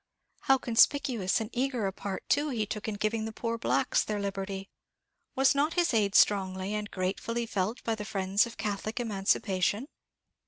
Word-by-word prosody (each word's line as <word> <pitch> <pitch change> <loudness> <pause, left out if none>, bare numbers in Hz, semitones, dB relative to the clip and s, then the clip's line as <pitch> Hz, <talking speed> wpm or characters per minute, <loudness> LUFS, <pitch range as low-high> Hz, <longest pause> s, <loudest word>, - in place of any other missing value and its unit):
How 270 - +4
conspicuous 240 -4 +2
and 220 +1 -5
eager 255 -3 -1
a 190 - -1
part 195 0 -6
too 290 +2 +2
he 225 -5 -1
took 210 +1 -5
in 215 - -2
giving 215 +2 -1
the 220 - -4
poor 230 +1 -3
Blacks 130 - +1
their 210 -1 -3
liberty! 195 -1 -4 0.7
was 270 +1 +4
not 290 +3 +1
his 345 -5 +2
aid 210 -2 +2
strongly 190 -1 +3
and 210 0 -3
gratefully 205 +5 -2
felt 210 +1 -2
by 225 - 0
the 215 -1 -4
friends 195 +1 +1
of 235 - -11
Catholic 215 +2 -3
emancipation? 200 0 0
215 Hz, 170 wpm, -29 LUFS, 195-235 Hz, 0.7 s, How